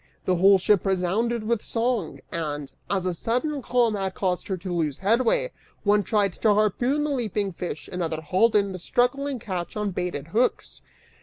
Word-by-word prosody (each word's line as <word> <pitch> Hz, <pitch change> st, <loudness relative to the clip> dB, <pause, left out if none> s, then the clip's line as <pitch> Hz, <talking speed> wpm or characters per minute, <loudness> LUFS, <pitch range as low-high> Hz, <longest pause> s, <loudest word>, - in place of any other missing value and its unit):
The 185 Hz, -1 st, +2 dB
whole 195 Hz, +2 st, +6 dB
ship 190 Hz, +1 st, +3 dB
resounded 200 Hz, +5 st, 0 dB
with 225 Hz, -1 st, 0 dB
song 230 Hz, -7 st, -1 dB
and, 150 Hz, -4 st, -4 dB, 0.2 s
as 190 Hz, -2 st, 0 dB
a 180 Hz, -, 0 dB
sudden 250 Hz, -, -1 dB
calm 240 Hz, -2 st, +2 dB
had 195 Hz, -2 st, -2 dB
caused 180 Hz, -2 st, -1 dB
her 190 Hz, -, -2 dB
to 180 Hz, 0 st, -5 dB
lose 155 Hz, -5 st, -1 dB
headway, 250 Hz, -, +2 dB, 0.3 s
one 205 Hz, 0 st, +4 dB
tried 205 Hz, -3 st, +1 dB
to 210 Hz, +2 st, +2 dB
harpoon 240 Hz, +8 st, +1 dB
the 300 Hz, -, -1 dB
leaping 210 Hz, -7 st, -1 dB
fish, 165 Hz, -3 st, -6 dB
another 165 Hz, -3 st, -3 dB
hauled 200 Hz, +8 st, +2 dB
in 200 Hz, -1 st, +3 dB
the 185 Hz, -, -6 dB
struggling 265 Hz, +8 st, 0 dB
catch 185 Hz, -4 st, -5 dB
on 210 Hz, -1 st, -1 dB
baited 175 Hz, -5 st, -4 dB
hooks. 235 Hz, +8 st, 0 dB
200 Hz, 175 wpm, -25 LUFS, 180-235 Hz, 0.3 s, whole